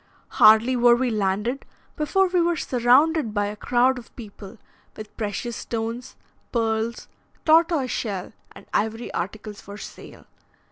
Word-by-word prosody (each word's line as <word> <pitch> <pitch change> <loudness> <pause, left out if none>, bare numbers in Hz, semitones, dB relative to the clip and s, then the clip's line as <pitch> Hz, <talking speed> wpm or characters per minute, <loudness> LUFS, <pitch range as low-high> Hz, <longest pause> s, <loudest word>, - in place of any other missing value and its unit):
Hardly 220 +4 +7
were 240 -1 +5
we 250 0 -1
landed 210 +5 -1 0.3
before 380 +6 +1
we 360 -1 +1
were 345 0 +1
surrounded 255 0 +2
by 205 0 +1
a 205 +1 -4
crowd 250 +4 +1
of 235 - -17
people 210 -1 -11 0.4
with 215 -1 -10
precious 225 +2 -4
stones, 230 +2 -5 0.4
pearls, 225 0 -1 0.4
tortoiseshell, 280 - +1 0.2
and - - -14
ivory 220 +3 -2
articles 210 +3 -5
for 200 +1 -10
sale. - - -11
235 Hz, 130 wpm, -23 LUFS, 215-260 Hz, 0.4 s, Hardly